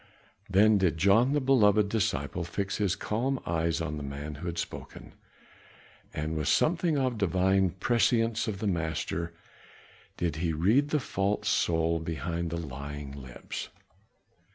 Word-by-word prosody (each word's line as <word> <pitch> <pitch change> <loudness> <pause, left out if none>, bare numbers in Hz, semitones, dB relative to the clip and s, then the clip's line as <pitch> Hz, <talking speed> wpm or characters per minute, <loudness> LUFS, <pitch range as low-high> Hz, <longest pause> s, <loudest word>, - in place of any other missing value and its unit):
Then 105 +2 +5
did 90 -4 +1
John, 110 - +4
the 145 - +3
beloved 110 -6 +4
disciple, 95 -7 -1
fix 95 +4 -3
his 100 -3 +1
calm 130 +5 -1
eyes 85 -1 0
on 80 -2 -3
the 75 - -5
man 70 +2 -5
who 75 +5 -7
had 85 0 -4
spoken; - - -7 1.0
with 75 -1 -2
something 165 -1 +2
of 130 -4 0
the 100 - +2
divine 95 +1 +2
prescience 115 +4 +1
of 105 -3 -2
the 105 - -4
Master 85 -1 -2 0.8
did 85 -3 -1
he 80 0 -1
read 110 - +3
the 150 - +2
false 100 -5 -1
soul 80 0 +1
behind 85 +1 -3
the 85 - -3
lying 70 -1 -6
lips. 65 -3 -7
90 Hz, 145 wpm, -29 LUFS, 80-110 Hz, 1.0 s, Then